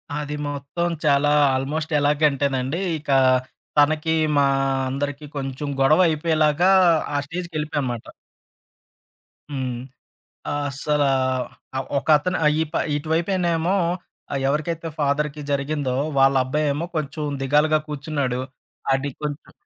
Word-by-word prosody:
అది 150 Hz, 0 st, -3 dB
మొత్తం 145 Hz, +5 st, -3 dB, 0.2 s
చాలా 145 Hz, 0 st, +4 dB, 0.3 s
ఆల్మోస్టెలాగ 150 Hz, +1 st, 0 dB
అంటేనండి. 135 Hz, +2 st, -1 dB, 0.2 s
ఇకా, 140 Hz, -2 st, 0 dB, 0.6 s
తనకి 155 Hz, +2 st, +3 dB, 0.2 s
మా 140 Hz, -, +5 dB, 0.4 s
అందరికి 145 Hz, +2 st, -3 dB
కొంచెం 135 Hz, +1 st, -4 dB
గొడవ 150 Hz, +5 st, +5 dB
అయిపోయేలాగా 155 Hz, +1 st, +2 dB, 0.5 s
ఆ -, -, +2 dB
స్టేజ్‌కెళ్ళిపోయానమాట. 150 Hz, -7 st, -3 dB, 1.4 s
హ్మ్. 130 Hz, -3 st, -3 dB, 0.8 s
అస్సలా 145 Hz, 0 st, 0 dB, 0.7 s
ఆహ్, 135 Hz, -, -3 dB
ఒకతను 155 Hz, +5 st, +2 dB
ఆహ్, 150 Hz, -, +5 dB
ఈ -, -, +4 dB
ప -, -, -22 dB, 0.2 s
ఇటువైపనేమో 170 Hz, +3 st, 0 dB, 0.6 s
ఆహ్, 135 Hz, -, -1 dB
ఎవరికైతే 165 Hz, +3 st, -2 dB
ఫాదర్‌కి 150 Hz, +1 st, 0 dB
జరిగిందో 140 Hz, -2 st, -1 dB, 0.2 s
వాళ్ళ 135 Hz, 0 st, +5 dB
అబ్బాయేమో 150 Hz, +4 st, -1 dB
కొంచెం 150 Hz, 0 st, -3 dB, 0.2 s
దిగాలుగా 150 Hz, +3 st, +3 dB
కూర్చున్నాడు. 140 Hz, -3 st, -2 dB, 0.5 s
అడి 135 Hz, +1 st, -2 dB
కొంచం 150 Hz, 0 st, -5 dB
145 Hz, 100 wpm, -23 LUFS, 140-155 Hz, 1.4 s, మా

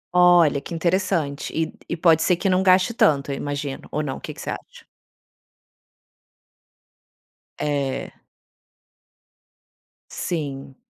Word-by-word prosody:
Olha 175 Hz, -5 st, +5 dB
que 170 Hz, -, -7 dB
interessante 165 Hz, -4 st, -1 dB
e 160 Hz, 0 st, -1 dB, 0.2 s
e 170 Hz, -, -2 dB
pode 165 Hz, -1 st, +4 dB
ser 180 Hz, -, +3 dB
que 175 Hz, +3 st, -2 dB
não 185 Hz, 0 st, +3 dB
gaste 185 Hz, +4 st, +4 dB
tanto, 140 Hz, -9 st, +2 dB
eu -, -, -2 dB
imagino. 145 Hz, -1 st, -5 dB
Ou 150 Hz, +1 st, -1 dB
não, 135 Hz, -, -4 dB
o -, -, -13 dB
que 155 Hz, -, -6 dB
que 150 Hz, -, -15 dB
você -, -, -4 dB
acha? -, -, -10 dB, 2.8 s
É. 140 Hz, -3 st, -2 dB, 2.0 s
Sim. 140 Hz, -5 st, -4 dB
160 Hz, 120 wpm, -23 LUFS, 140-180 Hz, 2.8 s, Olha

